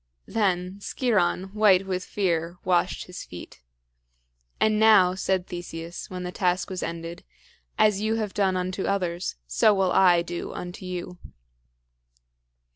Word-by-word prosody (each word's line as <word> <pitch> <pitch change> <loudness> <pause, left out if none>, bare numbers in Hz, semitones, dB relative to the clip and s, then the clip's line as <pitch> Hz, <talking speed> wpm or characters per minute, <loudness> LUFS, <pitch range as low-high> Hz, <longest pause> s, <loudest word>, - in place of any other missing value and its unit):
Then 185 -2 -1
Sciron, 195 -5 0
white 200 -3 +4
with 185 -1 -2
fear, 175 -4 -1
washed 180 0 +1
his 180 - -8
feet. 85 -7 -11 1.0
"And 215 -1 +3
now," 210 -5 +6
said 190 -1 -1
Theseus, 175 -1 -7
when 180 -1 -5
the 180 - -4
task 180 0 0
was 185 - -4
ended, 165 0 -5 0.5
"as 210 -2 +3
you 220 +1 +1
have 215 -3 -2
done 190 -2 +1
unto 185 +1 -2
others, 180 -3 -1
so 60 - +3
will 190 -2 +2
I 175 -3 +5
do 175 0 -5
unto 180 +1 -7
you." 180 0 -6
185 Hz, 135 wpm, -25 LUFS, 175-195 Hz, 1.0 s, now